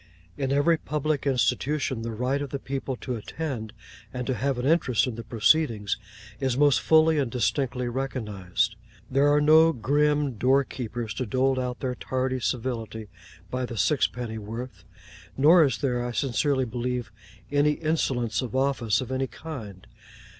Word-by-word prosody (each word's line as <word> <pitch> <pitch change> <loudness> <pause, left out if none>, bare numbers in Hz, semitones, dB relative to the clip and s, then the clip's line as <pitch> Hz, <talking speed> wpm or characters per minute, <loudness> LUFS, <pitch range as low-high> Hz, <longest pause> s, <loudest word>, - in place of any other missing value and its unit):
In 135 -1 -2
every 145 +4 +3
Public 150 -1 -2
Institution, 135 0 0
the 115 - -4
right 125 +5 -1
of 145 - -4
the 140 - -3
people 135 -1 -4
to 125 0 -4
attend, 115 -2 -5 0.4
and 125 -1 -4
to 130 - 0
have 135 +3 -1
an 125 - -2
interest 140 -6 +3
in 125 - -3
the 115 - -6
proceedings, 115 -2 +2 0.4
is 130 -2 0
most 145 -1 +4
fully 160 -1 +4
and 135 -4 0
distinctly 125 +1 -1
recognised. 110 -6 -2 0.4
There 140 +2 +4
are 145 - +4
no 160 +2 +6
grim 145 +1 +1
door 135 +2 +4
keepers 120 -4 -5
to 125 +3 -3
dole 130 +3 +1
out 125 -1 -3
their 130 -2 -1
tardy 130 +1 -2
civility 115 -3 -3 0.4
by 125 0 -2
the 120 - -7
sixpenny 120 -4 0
worth; 115 0 -7 0.5
nor 160 +5 +7
is 130 -6 +1
there, 125 -3 -1
I 120 0 -4
sincerely 130 +3 +1
believe, 120 0 -3 0.4
any 145 +1 +3
insolence 130 -8 0
of 130 0 -5
office 130 -5 +1
of 130 - -6
any 130 0 -1
kind. 110 - -9
130 Hz, 160 wpm, -26 LUFS, 115-140 Hz, 0.5 s, nor